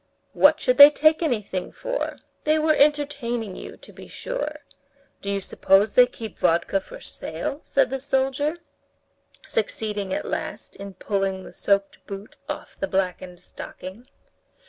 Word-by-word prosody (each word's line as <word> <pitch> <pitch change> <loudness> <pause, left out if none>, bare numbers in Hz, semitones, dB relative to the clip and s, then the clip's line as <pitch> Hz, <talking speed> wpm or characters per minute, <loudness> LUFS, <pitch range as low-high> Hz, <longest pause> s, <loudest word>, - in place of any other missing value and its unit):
'" - - -44
"What 300 +2 +5
should 250 -2 +1
they 285 +1 +13
take 310 +2 +3
anything 210 - -2
for? - - -3 0.3
They 310 +1 +3
were 310 0 +3
entertaining 280 -8 +1
you, - - -9
to - - -15
be - - -12
sure. 305 -12 -5 0.6
Do 200 - -5
you 200 0 0
suppose 195 +2 +3
they 250 0 +7
keep 225 -4 -9
vodka 170 +4 +2
for - - -11
sale?" 165 - -5
said 265 -2 +1
the 270 - -2
soldier, 270 +3 0 0.9
succeeding 210 -2 -2
at - - -2
last - - -5
in 200 -1 -9
pulling 195 -2 -2
the - - -12
soaked 200 0 0
boot 200 +1 -8
off 295 - -6
the 195 - -3
blackened 185 -1 -2
stocking. 190 +9 -9
230 Hz, 150 wpm, -24 LUFS, 195-290 Hz, 0.9 s, they